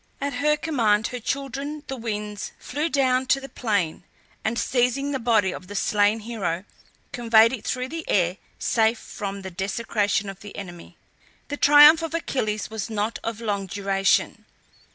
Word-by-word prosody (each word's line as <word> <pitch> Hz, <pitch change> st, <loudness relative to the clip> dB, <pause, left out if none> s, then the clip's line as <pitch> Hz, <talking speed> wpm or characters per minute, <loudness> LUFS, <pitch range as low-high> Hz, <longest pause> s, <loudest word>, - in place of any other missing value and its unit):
At 280 Hz, 0 st, -2 dB
her 300 Hz, +1 st, +3 dB
command 230 Hz, -9 st, +1 dB
her 250 Hz, -, -5 dB
children, 275 Hz, +4 st, -4 dB
the 270 Hz, -, -5 dB
Winds, 210 Hz, -3 st, -5 dB
flew 300 Hz, +5 st, -3 dB
down 260 Hz, -3 st, +2 dB
to 275 Hz, -, +3 dB
the 270 Hz, -, -8 dB
plain, 200 Hz, -12 st, -1 dB, 0.4 s
and 220 Hz, +2 st, -1 dB
seizing 255 Hz, +4 st, +1 dB
the 270 Hz, -, -1 dB
body 225 Hz, -5 st, +2 dB
of 180 Hz, -, -9 dB
the 205 Hz, -, -8 dB
slain 205 Hz, +2 st, +2 dB
hero 195 Hz, -6 st, -3 dB, 0.5 s
conveyed 230 Hz, -1 st, +4 dB
it 235 Hz, -, -5 dB
through 255 Hz, 0 st, -2 dB
the 325 Hz, +2 st, -5 dB
air 180 Hz, -1 st, +2 dB, 0.2 s
safe 225 Hz, 0 st, +2 dB
from 200 Hz, -2 st, -6 dB
the 190 Hz, -, -6 dB
desecration 205 Hz, +2 st, -1 dB
of 195 Hz, -1 st, -7 dB
the 205 Hz, -, -11 dB
enemy. 175 Hz, -4 st, -9 dB, 0.5 s
The 290 Hz, -, -3 dB
triumph 295 Hz, +3 st, +8 dB
of 330 Hz, 0 st, -3 dB
Achilles 215 Hz, -10 st, -2 dB
was 220 Hz, -2 st, -4 dB
not 215 Hz, +1 st, -2 dB
of 230 Hz, 0 st, -4 dB
long 200 Hz, -3 st, -2 dB
duration. 195 Hz, 0 st, 0 dB
225 Hz, 165 wpm, -24 LUFS, 205-270 Hz, 0.5 s, triumph